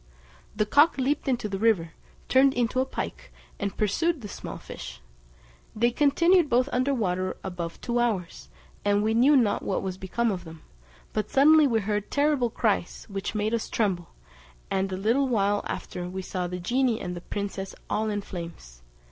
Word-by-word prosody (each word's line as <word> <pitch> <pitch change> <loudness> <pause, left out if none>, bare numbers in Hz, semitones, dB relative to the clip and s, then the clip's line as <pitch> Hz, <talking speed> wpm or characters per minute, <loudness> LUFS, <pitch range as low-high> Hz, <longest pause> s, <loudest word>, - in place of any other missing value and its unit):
The 210 0 +1
cock 290 +9 +4
leaped 275 +3 0
into 245 -4 0
the 195 -2 -4
river, 195 -7 +2 0.4
turned 265 +1 +4
into 245 +1 +1
a 260 - +1
pike, - - -6 0.3
and 200 -1 -3
pursued 300 - +1
the 210 - -6
small - - -7
fish; - - -9 0.8
they 235 +3 +2
continued 315 +5 +4
both 250 +2 +3
under 255 +3 +2
water 185 -7 -1
above 175 -2 -5
two 240 0 -1
hours, 190 - -2 0.3
and 205 0 +2
we 220 +1 +1
knew 265 +6 +5
not 225 -5 +2
what 195 - -2
was 190 -1 -4
become 230 +5 0
of 180 -3 -4
them, 160 -1 -12 0.5
but 215 -1 -1
suddenly 300 +2 +6
we 225 -4 +1
heard 205 0 -2
terrible 285 -4 +2
cries, 215 -6 -1
which 195 +2 -4
made 215 +1 0
us 230 - -1
tremble, 190 -6 -1 0.6
and 190 0 0
a 185 - -2
little 235 +8 +2
while 205 -4 +1
after 180 0 -5
we 190 +1 -5
saw 180 -1 -3
the 180 +1 -5
genie 240 +4 +1
and 175 -1 -5
princess 195 -1 -4
all 220 +1 0
in 205 -1 -1
flames. 170 - -9
215 Hz, 175 wpm, -26 LUFS, 190-255 Hz, 0.8 s, suddenly